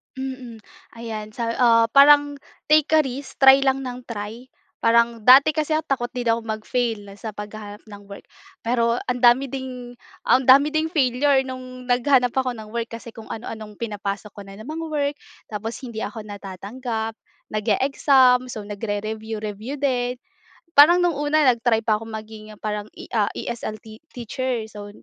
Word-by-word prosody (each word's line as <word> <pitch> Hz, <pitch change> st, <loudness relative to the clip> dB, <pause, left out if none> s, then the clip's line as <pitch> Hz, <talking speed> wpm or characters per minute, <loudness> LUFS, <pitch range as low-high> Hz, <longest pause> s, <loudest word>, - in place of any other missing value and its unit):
Mm. 260 Hz, -4 st, -7 dB, 0.3 s
Ayan 225 Hz, -2 st, -6 dB
sa, 230 Hz, -1 st, -2 dB
ah, 230 Hz, -2 st, +5 dB
parang 290 Hz, +1 st, +6 dB, 0.3 s
take 305 Hz, -1 st, +5 dB
a 310 Hz, -, +6 dB
risk 270 Hz, +1 st, -7 dB
try 270 Hz, 0 st, +8 dB
lang 270 Hz, 0 st, +1 dB
ng 250 Hz, -1 st, -7 dB
try, 225 Hz, +2 st, -7 dB, 0.3 s
parang 235 Hz, 0 st, +3 dB
dati 270 Hz, +4 st, +8 dB
kasi 310 Hz, 0 st, -1 dB
takot 250 Hz, -3 st, -1 dB
din 245 Hz, -2 st, -2 dB
ako 230 Hz, -, +1 dB
mag-fail 220 Hz, -1 st, -3 dB
sa 215 Hz, +1 st, -7 dB
paghahanap 210 Hz, 0 st, -8 dB
ng 205 Hz, -2 st, -12 dB
work. 200 Hz, 0 st, -10 dB, 0.4 s
Pero 235 Hz, 0 st, +1 dB
ang 250 Hz, 0 st, -1 dB
dami 250 Hz, +3 st, +4 dB
ding, 250 Hz, -2 st, -7 dB, 0.3 s
ang 260 Hz, 0 st, +3 dB
dami 280 Hz, +3 st, +7 dB
ding 310 Hz, +1 st, 0 dB
failure 275 Hz, -3 st, +2 dB
no'ng 255 Hz, -1 st, -8 dB
naghanap 245 Hz, 0 st, +3 dB
ako 260 Hz, -2 st, -1 dB
ng 215 Hz, -2 st, -10 dB
work, 235 Hz, 0 st, -3 dB
kasi 230 Hz, 0 st, -10 dB
kung 225 Hz, 0 st, -12 dB
ano-anong 220 Hz, -2 st, -7 dB
pinapasok 205 Hz, -2 st, -5 dB
ko 205 Hz, -, -11 dB
na 195 Hz, 0 st, -11 dB
mga 315 Hz, +5 st, -5 dB
work, 290 Hz, -2 st, -1 dB, 0.4 s
tapos 220 Hz, +2 st, -4 dB
hindi 235 Hz, -3 st, -6 dB
ako 215 Hz, +1 st, -5 dB
natatanggap. 215 Hz, +3 st, -5 dB, 0.3 s
Nag-eexam, 255 Hz, +3 st, +3 dB
so 220 Hz, -, -6 dB
nagre-review-review 215 Hz, +2 st, -5 dB
din, 250 Hz, -3 st, 0 dB, 0.6 s
parang 330 Hz, +5 st, +8 dB
nung 350 Hz, -, +2 dB
una 295 Hz, +1 st, +2 dB
nag-try 230 Hz, -1 st, +1 dB
pa 215 Hz, -1 st, +2 dB
ako 225 Hz, -, -9 dB
maging 215 Hz, -1 st, -9 dB
parang 210 Hz, -1 st, -3 dB
E, -, -, -9 dB
ah, 215 Hz, -4 st, +2 dB
ESL 235 Hz, -2 st, -5 dB, 0.4 s
teacher, 245 Hz, 0 st, -3 dB
so 205 Hz, -1 st, -9 dB
235 Hz, 155 wpm, -22 LUFS, 215-265 Hz, 0.6 s, try